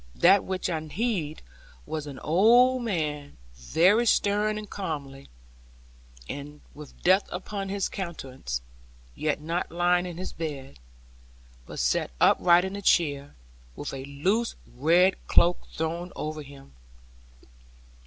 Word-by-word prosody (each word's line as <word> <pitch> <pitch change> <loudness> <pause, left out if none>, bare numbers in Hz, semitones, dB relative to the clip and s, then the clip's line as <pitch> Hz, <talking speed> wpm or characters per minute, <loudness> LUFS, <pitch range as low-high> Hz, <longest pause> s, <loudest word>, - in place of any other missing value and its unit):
That 195 +3 +5
which 185 -1 -3
I 165 -3 -1
heeded 160 -1 -3 0.4
was 155 -2 -5
an 140 -2 -8
old 240 +9 +5
man, 150 -10 -3 0.2
very 175 - +3
stern 210 +1 +2
and 215 0 -6
comely, 140 -9 -6 1.4
with 150 -1 -12
death 190 +3 +4
upon 195 +2 -5
his 195 -1 -1
countenance; 135 - -5 0.5
yet 150 - -2
not 165 +3 -3
lying 175 +1 +2
in 175 -2 -7
his 185 - -6
bed, 140 - -6 0.9
but - - -9
set - - +1
upright 175 +1 +5
in 190 +1 -5
a 200 - -5
chair, 145 - +1 0.4
with - - -6
a 135 -1 -5
loose 190 +12 0 0.2
red 175 +8 +4
cloak 175 +1 +3
thrown 170 +3 -4
over 155 0 -4
him. 140 -1 -13
170 Hz, 125 wpm, -27 LUFS, 150-195 Hz, 1.4 s, That